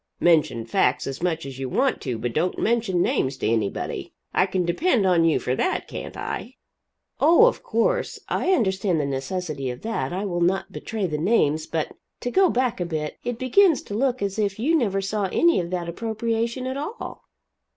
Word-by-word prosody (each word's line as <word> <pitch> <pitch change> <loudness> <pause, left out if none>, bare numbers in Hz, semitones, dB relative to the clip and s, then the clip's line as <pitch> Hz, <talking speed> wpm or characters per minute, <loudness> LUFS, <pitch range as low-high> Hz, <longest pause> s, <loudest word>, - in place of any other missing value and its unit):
Mention 155 -9 +3
facts 125 +3 +1
as 135 +2 -5
much 165 -3 -1
as 135 -1 -8
you 130 -1 -3
want 265 - +1
to, 125 -4 -3
but 115 +1 -3
don't 170 +7 0
mention 220 -6 +1
names 130 0 0
to - - -1
anybody. 110 -3 -2 0.2
I 185 - +3
can 185 -1 0
depend 220 - +2
on 175 -3 +4
you 165 - +4
for 125 - -1
that, 370 - -1
can't - - -7
I?" - - -5 0.6
"Oh, 340 +8 +7
of - - +1
course. - - 0
I 375 - 0
understand 190 - +1
the 145 - 0
necessity 140 +1 -3
of 125 +1 -7
that. 220 -13 -2
I 190 +3 -2
will 175 -3 -2
not 185 +3 +1
betray 220 -3 -3
the 155 -4 -2
names. 155 -5 +2
But 160 -2 -3 0.3
to 245 - -2
go 380 +4 +4
back 245 -4 0
a - - 0
bit, 155 -2 -4
it 245 -1 -3
begins 310 +7 +4
to - - -8
look 255 +1 0
as 200 +1 -2
if 200 -2 0
you 290 +9 +2
never 200 -10 +1
saw 200 +1 -1
any 340 - +4
of 170 -1 -3
that 175 -1 -3
appropriation 230 +5 -2
at 260 +1 -3
all?" 360 +12 -6
190 Hz, 200 wpm, -24 LUFS, 155-235 Hz, 0.6 s, Oh